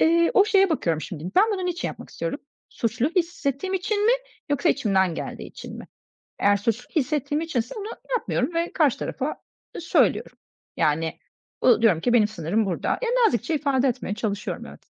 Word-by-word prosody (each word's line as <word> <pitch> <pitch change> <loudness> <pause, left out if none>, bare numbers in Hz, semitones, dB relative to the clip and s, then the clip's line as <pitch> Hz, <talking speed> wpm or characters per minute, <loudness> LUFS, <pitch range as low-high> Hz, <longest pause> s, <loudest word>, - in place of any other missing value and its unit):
Eee, 335 +1 +4
o 400 - +7
şeye 390 -3 +4
bakıyorum 165 - 0
şimdi. 160 -2 -7
Ben 390 - +8
bunu 375 -3 -2
niçin 355 0 -2
yapmak - - -9
istiyorum? 165 +11 -4 0.3
Suçlu 235 +3 0
hissettiğim 345 0 -1
için 410 +3 0
mi 470 - +6 0.4
yoksa 285 - +2
içimden 190 -5 +2
geldiği - - -6
için - - -9
mi? - - -9 0.5
Eğer 200 0 +4
suçlu 230 +4 -2
hissettiğim 295 +1 0
içinse 255 -7 -2
bunu 410 - -5 0.3
yapmıyorum 345 - -2
ve 335 +1 -1
karşı 295 -6 +2
tarafa, 270 - -3
ııı, 305 - -9
söylüyorum. 335 - +1 0.4
Yani, 160 +2 0 0.4
bu 235 -3 +5
diyorum 195 -8 +4
ki 240 +8 +1
benim 220 -3 +5
sınırım 205 +2 -1
burada. 180 -3 -2
Ya, - - 0 0.2
nazikçe 245 - 0
ifade 275 -2 +2
etmeye 240 -5 -2
çalışıyorum, 210 -2 -3
evet. - - -13
255 Hz, 175 wpm, -24 LUFS, 205-335 Hz, 0.5 s, Ben